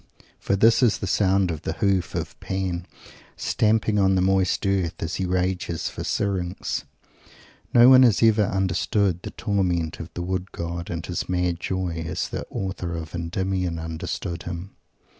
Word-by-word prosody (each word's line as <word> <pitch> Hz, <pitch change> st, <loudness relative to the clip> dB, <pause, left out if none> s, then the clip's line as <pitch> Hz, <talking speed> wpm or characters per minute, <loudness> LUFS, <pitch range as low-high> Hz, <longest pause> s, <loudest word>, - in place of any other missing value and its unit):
For 100 Hz, -, 0 dB
this 115 Hz, +4 st, +5 dB
is 120 Hz, -4 st, +4 dB
the -, -, -4 dB
sound 95 Hz, -2 st, +2 dB
of 80 Hz, -2 st, -5 dB
the 80 Hz, -, -3 dB
hoof 95 Hz, -1 st, 0 dB
of -, -, -4 dB
Pan, 95 Hz, -2 st, -3 dB, 0.5 s
stamping 110 Hz, -1 st, +1 dB
on 95 Hz, -1 st, +4 dB
the 95 Hz, -, +2 dB
moist 95 Hz, +1 st, +2 dB
earth, 95 Hz, -3 st, +1 dB
as 80 Hz, -, -3 dB
he 95 Hz, -, -1 dB
rages 90 Hz, -2 st, -1 dB
for -, -, -6 dB
Syrinx. 95 Hz, -3 st, -2 dB, 0.9 s
No 120 Hz, 0 st, +7 dB
one 130 Hz, -1 st, +9 dB
has 115 Hz, -4 st, +5 dB
ever 110 Hz, -2 st, +5 dB
understood 95 Hz, -1 st, 0 dB
the -, -, -6 dB
torment 90 Hz, -7 st, -1 dB
of 80 Hz, 0 st, -7 dB
the 85 Hz, -, -3 dB
Wood 95 Hz, +1 st, -3 dB
god 85 Hz, 0 st, -5 dB
and 85 Hz, -1 st, -4 dB
his 90 Hz, -, -4 dB
mad 90 Hz, -1 st, 0 dB
joy, 90 Hz, -3 st, -2 dB
as -, -, -2 dB
the -, -, -5 dB
author 95 Hz, -3 st, -4 dB
of 80 Hz, -1 st, -6 dB
Endymion 90 Hz, +1 st, -2 dB
understood 80 Hz, +1 st, -4 dB
them. 90 Hz, +3 st, -7 dB
95 Hz, 165 wpm, -24 LUFS, 85-100 Hz, 0.9 s, one